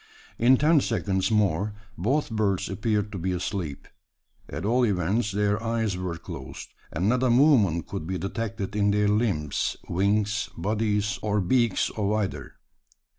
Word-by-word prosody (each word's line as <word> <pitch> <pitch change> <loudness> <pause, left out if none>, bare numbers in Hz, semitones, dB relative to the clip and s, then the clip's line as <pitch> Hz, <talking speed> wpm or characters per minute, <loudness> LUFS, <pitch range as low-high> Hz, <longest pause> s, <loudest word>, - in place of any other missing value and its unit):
In 125 +3 +6
ten 155 +3 +4
seconds 100 -5 0
more 105 -1 +1 0.2
both 135 - 0
birds 100 -4 0
appeared 105 +1 -1
to 100 - -5
be 95 +2 -1
asleep. 90 -5 -4 0.6
At 80 - -5
all 125 +4 +2
events, 105 +1 +1
their 105 +1 0
eyes 115 -3 -1
were 90 -2 -4
closed; 80 -7 -8 0.2
and 90 +5 -1
not 125 +3 +2
a 130 - +3
movement 120 - +4
could 80 - -6
be 95 0 -2
detected 105 +1 -4
in 105 -1 +2
the 105 +1 +2
limbs, 100 - 0
wings, 105 +3 0
bodies, 105 +1 0
or 105 -1 0
beaks 115 +3 +1
of 105 -1 -1
either! 85 - -3
105 Hz, 150 wpm, -26 LUFS, 95-115 Hz, 0.6 s, In